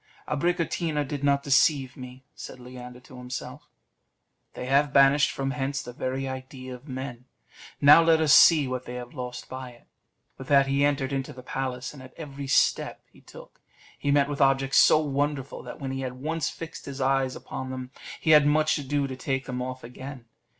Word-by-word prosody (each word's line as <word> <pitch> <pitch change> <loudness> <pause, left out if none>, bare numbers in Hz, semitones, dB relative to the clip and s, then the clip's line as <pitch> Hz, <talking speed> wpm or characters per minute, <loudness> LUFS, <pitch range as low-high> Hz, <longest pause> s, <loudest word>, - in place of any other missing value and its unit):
"Abricotina 160 -1 -1
did 145 0 -5
not 140 0 +2
deceive 135 -1 +3
me," 130 0 -11
said - - -10
Leander 125 0 -10
to 130 0 -13
himself; 125 0 -7 0.9
"they - - -5
have 140 +2 +2
banished 140 +1 +5
from 135 0 -3
hence 135 -1 -3
the 125 - -9
very 130 +2 -3
idea 130 0 -7
of 125 +4 -12
men; 130 -2 -6 0.5
now 150 +3 +8
let 165 -1 +4
us 155 -2 +4
see 155 -4 +7
what 130 0 -4
they 125 - -7
have 125 0 -8
lost 125 -3 -6
by 130 -1 -7
it." 120 -1 -18 0.5
With 135 - -8
that 140 -1 +5
he 140 +1 +1
entered 140 -1 0
into 135 -1 -3
the 125 0 -12
palace, 130 0 -4
and 140 - -12
at 130 - -14
every 140 -3 -7
step 135 - +1
he - - -20
took, - - -15 0.4
he 145 - -2
met 140 -1 +4
with 145 0 -4
objects 135 0 +3
so - - +7
wonderful, 145 -2 -2
that - - -9
when 135 -2 -4
he 135 - -4
had 130 -1 -4
once 155 +4 -2
fixed 165 -1 -9
his 140 -1 -7
eyes 135 -1 +1
upon 130 0 -7
them 130 0 -6 0.3
he 160 - +1
had 150 -2 +7
much 155 0 +2
ado 145 0 -1
to 130 -1 -5
take 135 +1 -3
them 125 -1 -4
off 130 0 -5
again. 130 +1 -9
135 Hz, 195 wpm, -26 LUFS, 130-145 Hz, 0.9 s, now